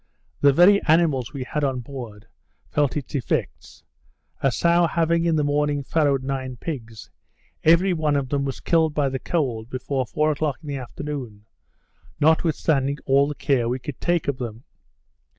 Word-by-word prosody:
The 145 - +6
very 180 +7 +6
animals 155 -6 +2
we 140 -3 -5
had 150 +4 -3
on 130 -3 0
board 115 -5 -9 0.5
felt 145 -1 +1
its 145 - -6
effects. 135 -4 -3 0.6
A 135 - +2
sow 170 +5 +3
having 170 0 +1
in 165 -1 +2
the 150 - +1
morning 145 0 0
farrowed 140 -2 +1
nine 130 -1 -3
pigs, 115 -6 -7 0.5
every 170 +4 +5
one 155 -3 0
of 135 -2 -1
them 140 0 0
was 135 -1 -4
killed 160 -3 +2
by 145 -2 +1
the 130 0 -3
cold 125 -10 -2
before 130 0 -3
four 150 +9 +1
o'clock 145 -2 -1
in 150 - -8
the 140 - -3
afternoon, 125 -4 -7 0.7
notwithstanding 150 -3 +2
all 140 +1 +4
the 150 - -4
care 125 -6 +1
we 125 - -1
could 130 +1 -8
take 175 -2 0
of 140 -2 -1
them. 115 -1 -6
140 Hz, 170 wpm, -23 LUFS, 130-155 Hz, 0.7 s, The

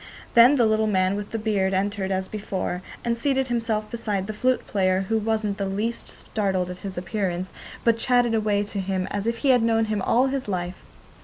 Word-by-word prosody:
Then 240 +4 +8
the 240 -4 +4
little 220 0 +2
man 190 -1 +2
with 205 0 -5
the 225 - -3
beard 200 -3 0
entered 195 0 -1
as 190 -1 -1
before 190 -3 -3 0.2
and 235 0 0
seated 265 0 +1
himself 225 -3 -1
beside 210 -5 -2
the 215 - -4
flute 255 +4 +1
player, 185 -2 +1
who 225 0 +2
wasn't 215 -2 -1
the 195 - -1
least 210 +5 -2
startled 190 -4 -2
at 180 - -8
his 190 -1 -6
appearance, 185 0 -2 0.3
but 230 -1 +3
chatted 245 -2 +2
away 210 -2 +1
to 205 0 -4
him 190 -1 -1
as 205 +2 -2
if 230 0 0
he - - +4
had 250 -2 +5
known 225 0 +2
him 215 -2 -1
all 240 +6 +3
his 270 -2 -2
life. 180 -2 -3
210 Hz, 210 wpm, -24 LUFS, 190-230 Hz, 0.3 s, Then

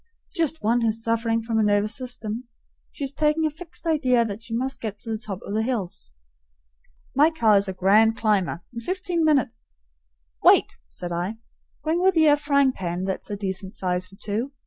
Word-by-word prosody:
"Just 325 - 0
one 235 +3 +2
who's 225 0 0
sufferin' 230 0 0
from 225 -1 0
a - - +3
nervous 205 0 +2
system. 245 -2 -4 0.5
She's 275 -1 -4
taken 305 +2 +2
a 310 - +1
fixed 330 +3 -10
idea 255 -7 +3
that 210 0 -5
she 225 0 -4
must 265 +2 -3
get 215 -3 -4
to 225 - -5
the 220 - -1
top 200 -4 -6
o' 200 - -5
the 215 - +1
hills." 220 - -3 1.1
"My 295 +4 +6
car 230 -10 +3
is 200 0 +3
a 190 - -3
grand 210 +4 +4
climber. 200 -6 0
In 235 - -5
fifteen 360 - -1
minutes 275 -7 +1 0.3
" - - -40
"Wait!" - - +5
said 175 - -7
I. 180 +6 -2 0.5
"Bring 320 +3 +1
with 375 -1 +3
ye 320 - +6
a 290 - +7
frying 280 -2 +2
pan 180 -5 -4
that's 190 0 -3
a 205 - -3
decent 190 -1 -4
size 180 0 -1
for 195 - -16
two. 215 +6 -3
225 Hz, 195 wpm, -24 LUFS, 200-280 Hz, 1.1 s, a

